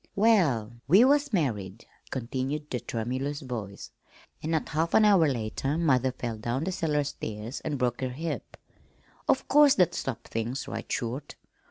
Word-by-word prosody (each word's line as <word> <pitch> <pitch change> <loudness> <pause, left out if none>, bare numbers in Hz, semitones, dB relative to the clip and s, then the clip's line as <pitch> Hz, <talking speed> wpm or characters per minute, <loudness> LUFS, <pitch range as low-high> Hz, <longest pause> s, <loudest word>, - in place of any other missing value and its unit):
"Well, 155 - +3
we 195 - +7
was 285 +1 +3
married," 115 - -1 0.2
continued 135 +4 -3
the 125 - -1
tremulous 130 +5 -3
voice, 110 -7 -6 0.5
"an' 155 - -4
not 160 -2 0
half 160 +2 0
an 215 - +6
hour 195 -6 +6
later 130 +3 -2
mother 130 -6 +2
fell 120 -3 -5
down 120 +6 -2
the 190 - -1
cellar 150 -4 0
stairs 110 -2 -5
an' 150 -2 -2
broke 125 -1 -1
her 130 - -1
hip. 160 +6 -5 0.7
Of - - +2
course 295 -2 +6
that 180 -4 +3
stopped 135 -4 -4
things 115 +4 -3
right - - -6
short. 125 +4 -3
135 Hz, 160 wpm, -28 LUFS, 120-165 Hz, 0.7 s, we